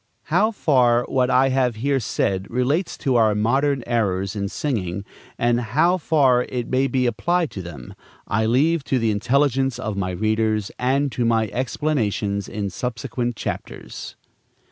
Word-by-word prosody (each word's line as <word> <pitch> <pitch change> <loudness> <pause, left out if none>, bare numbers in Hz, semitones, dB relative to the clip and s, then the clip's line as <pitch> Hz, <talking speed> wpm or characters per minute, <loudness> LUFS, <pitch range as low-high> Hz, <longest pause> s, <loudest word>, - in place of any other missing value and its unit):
How 205 +6 +4
far 125 - +3
what 130 0 0
I 135 +1 +4
have 130 -3 +1
here 135 +4 0
said 100 -4 -1
relates 135 +9 0
to 130 -5 +1
our 110 -2 +3
modern 135 +5 +1
errors 100 -5 -1
in 100 -1 -2
singing, 100 -9 -3 0.3
and 120 0 +2
how 145 +11 +2
far 140 -6 +3
it 120 -2 -3
may 130 +1 +2
be 130 0 0
applied 170 +8 0
to 95 - -6
them, 75 -8 -9 0.3
I 110 +2 +1
leave 145 +7 +2
to 130 - +1
the 115 -2 +1
intelligence 135 +4 +1
of 105 - -4
my 95 -2 -2
readers 110 +2 0
and 135 +3 +1
to 120 - -1
my 115 -2 +2
explanations 115 -7 -1
in 100 -2 -3
subsequent 120 +3 -3
chapters. - - -6
120 Hz, 155 wpm, -22 LUFS, 105-135 Hz, 0.3 s, How